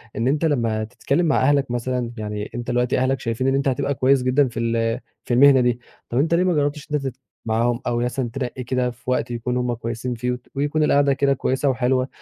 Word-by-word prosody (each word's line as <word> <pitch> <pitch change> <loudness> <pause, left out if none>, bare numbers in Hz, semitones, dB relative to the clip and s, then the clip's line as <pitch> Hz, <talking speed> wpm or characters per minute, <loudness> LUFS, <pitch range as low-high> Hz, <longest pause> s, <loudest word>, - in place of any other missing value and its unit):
إن 115 +3 0
أنت 145 +4 +1
لمّا 115 -8 0
تتكلم 140 +8 -1
مع 155 - +2
أهلك 140 -1 +2
مثلًا 120 0 -2
يعني 105 -1 -5
أنت 120 0 -5
دلوقتي 125 +1 +1
أهلك 130 0 +1
شايفين 115 +3 -2
إن 135 - +2
أنت 140 0 0
هتبقى 135 +2 0
كويّس 130 +1 +3
جدًا 130 +2 +3
في 120 -2 -6
ال 115 0 0 0.3
في - - -1
المهنة 135 +1 +6
دي. 120 -1 +1 0.3
طَب 120 - -2
أنت 160 +5 +2
ليه 170 +2 +3
ما 185 -1 +2
جرّبتش 145 -1 -1
إن - - +1
أنت 135 -2 -1
تت 130 - -6 0.3
معاهم 115 +2 +1
أو 120 - 0
مثلًا 125 +1 -1
تنّقي 130 -1 -4
كده 125 0 0
في 120 +1 -10
وقت 125 - -1
يكونوا 125 +1 -2
هُمّ 125 -1 -1
كويسين 115 +1 -4
فيه 125 +2 -2
وت 125 0 -6
ويكون 145 +2 0
القعدة 140 -1 +3
كده 140 +1 +2
كويّسة 135 +1 0
وحلوة، 130 0 +1
125 Hz, 230 wpm, -22 LUFS, 120-140 Hz, 0.3 s, المهنة